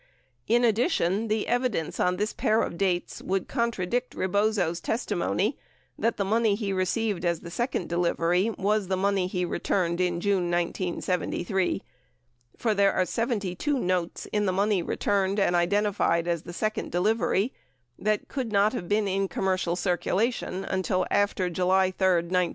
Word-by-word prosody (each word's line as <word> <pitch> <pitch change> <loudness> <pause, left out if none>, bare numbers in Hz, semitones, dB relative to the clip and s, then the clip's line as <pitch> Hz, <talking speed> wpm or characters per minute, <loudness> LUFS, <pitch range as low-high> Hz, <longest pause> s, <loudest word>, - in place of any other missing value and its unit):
In 240 +2 +3
addition, 225 - +2
the 215 0 0
evidence 245 -10 -1
on 180 0 +2
this 210 +2 -1
pair 220 +1 +2
of - - -4
dates 180 -1 -1
would 190 0 -1
contradict 235 -1 -1
Rebozo's 190 -3 +1
testimony 220 0 -1 0.4
that 230 - 0
the 200 - 0
money 220 0 +2
he 200 -2 -2
received 190 0 0
as 170 -2 0
the 170 - -9
second 240 -2 -2
delivery 175 +3 +1
was 205 0 +1
the 190 0 0
money 195 -1 +1
he 180 -1 -1
returned 175 0 0
in 175 -1 0
June 185 -2 +1
1973, 175 +1 -1 0.7
for 225 -2 +1
there 200 -1 +3
are 185 - +2
72 230 - -1
notes 180 -6 -1
in 210 -1 +1
the - - +2
money 200 0 +1
returned 200 +2 0
and 180 -3 +2
identified 175 -2 +1
as 170 -2 0
the 175 - -9
second 215 +4 -2
delivery 210 +4 +1 0.5
that 215 0 0
could 255 -5 -4
not 205 +2 +3
have 180 -9 -5
been 205 0 +2
in 195 0 0
com 190 - -3
mercial 185 -2 +1
circulation 190 +2 -1
until 185 0 0
after 200 -2 +1
July 185 +2 +2
3, 190 0 +1 0.2
1970. 180 0 +1
195 Hz, 155 wpm, -27 LUFS, 180-215 Hz, 0.7 s, In